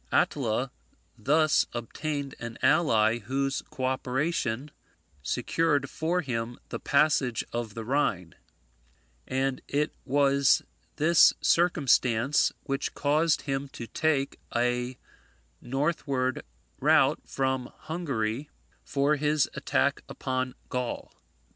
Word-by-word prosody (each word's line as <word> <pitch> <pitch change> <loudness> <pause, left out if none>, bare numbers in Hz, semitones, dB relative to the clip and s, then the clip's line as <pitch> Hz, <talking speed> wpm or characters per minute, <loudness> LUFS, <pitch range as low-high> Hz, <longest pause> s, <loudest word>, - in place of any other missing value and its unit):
Attila - - +1 0.4
thus 155 +2 +3
obtained 140 +4 -4
an 120 -1 -6
ally 115 -8 +4
whose 135 +5 -1
co 130 - -4
operation 130 0 -1 0.5
secured 145 - 0
for 170 +3 0
him 120 -4 -3
the - - -4
passage 140 -5 +2
of 115 -3 -3
the 115 -1 -5
Rhine; 105 - 0 0.9
and 130 0 -1
it 150 +2 0
was 140 0 +3 0.3
this 165 +3 +5
circumstance 140 -6 +3
which 135 -1 -3
caused 155 +2 +2
him 135 -1 -2
to 120 - -6
take 140 +3 0 0.2
a 125 +1 0 0.6
northward 135 -1 -1 0.4
route - - +4
from 130 -1 -2
Hungary 140 -5 -3 0.3
for 145 +2 +1
his 150 0 +2
attack - - 0
upon 130 -1 -3
Gaul. 125 -1 -4
135 Hz, 100 wpm, -28 LUFS, 125-150 Hz, 0.9 s, this